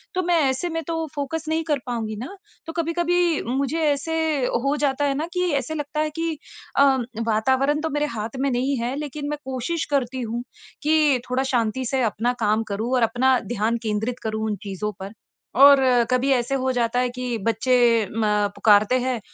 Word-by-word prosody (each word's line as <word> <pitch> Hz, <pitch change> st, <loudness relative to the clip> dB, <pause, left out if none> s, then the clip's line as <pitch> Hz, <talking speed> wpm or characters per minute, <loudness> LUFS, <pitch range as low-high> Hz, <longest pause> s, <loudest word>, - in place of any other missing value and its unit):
तो 370 Hz, -, +1 dB
मैं 350 Hz, -, +4 dB
ऐसे 265 Hz, +7 st, -2 dB
में 330 Hz, 0 st, -2 dB
तो 325 Hz, -1 st, -2 dB
फ़ोकस 300 Hz, +3 st, -3 dB
नहीं 320 Hz, +1 st, 0 dB
कर 300 Hz, -3 st, 0 dB
पाऊँगी 225 Hz, -3 st, -3 dB
ना। 270 Hz, -, -7 dB, 0.3 s
तो 325 Hz, -, -6 dB
कभी-कभी 345 Hz, 0 st, +1 dB
मुझे 275 Hz, +5 st, -1 dB
ऐसे 290 Hz, +3 st, -2 dB, 0.5 s
हो 280 Hz, +1 st, +2 dB
जाता 280 Hz, +1 st, 0 dB
है 280 Hz, -, +1 dB
ना 310 Hz, -, -1 dB
कि 360 Hz, -1 st, 0 dB
ऐसे 280 Hz, +2 st, -1 dB
लगता 295 Hz, 0 st, -4 dB
है 310 Hz, 0 st, +1 dB
कि 330 Hz, -1 st, -1 dB, 0.4 s
अ, 280 Hz, -, +7 dB, 0.4 s
वातावरण 265 Hz, +7 st, +2 dB
तो 320 Hz, -, -1 dB
मेरे 295 Hz, 0 st, 0 dB
हाथ 220 Hz, +4 st, -5 dB
में 275 Hz, +1 st, +1 dB
नहीं 260 Hz, +3 st, 0 dB
है 240 Hz, +3 st, -2 dB
लेकिन 295 Hz, 0 st, -5 dB
मैं 295 Hz, 0 st, -3 dB
कोशिश 265 Hz, +5 st, -2 dB
करती 260 Hz, -2 st, 0 dB
हूँ 235 Hz, +1 st, -3 dB, 0.4 s
कि 300 Hz, -3 st, +3 dB
थोड़ा 255 Hz, +1 st, +1 dB
शांति 240 Hz, +2 st, 0 dB
से 265 Hz, -1 st, 0 dB
अपना 230 Hz, +2 st, 0 dB
काम 215 Hz, +2 st, +2 dB
करूँ 225 Hz, +5 st, -2 dB
और 250 Hz, -, +2 dB
अपना 245 Hz, +3 st, +3 dB
ध्यान 225 Hz, +2 st, 0 dB
केंद्रित 220 Hz, +3 st, -2 dB
करूँ 220 Hz, 0 st, -2 dB
उन 210 Hz, -, -1 dB
चीज़ों 200 Hz, +2 st, -3 dB
पर। 195 Hz, +1 st, -6 dB, 0.5 s
और 280 Hz, 0 st, +9 dB, 0.3 s
कभी 255 Hz, +2 st, +2 dB
ऐसे 245 Hz, +1 st, 0 dB
हो 260 Hz, -1 st, 0 dB
जाता 240 Hz, 0 st, 0 dB
है 250 Hz, 0 st, +1 dB
कि 250 Hz, -2 st, -3 dB
बच्चे 230 Hz, +3 st, 0 dB, 0.5 s
म 225 Hz, -, +1 dB, 0.3 s
पुकारते 215 Hz, +4 st, +4 dB
हैं 250 Hz, -1 st, -1 dB
260 Hz, 190 wpm, -23 LUFS, 235-300 Hz, 0.5 s, और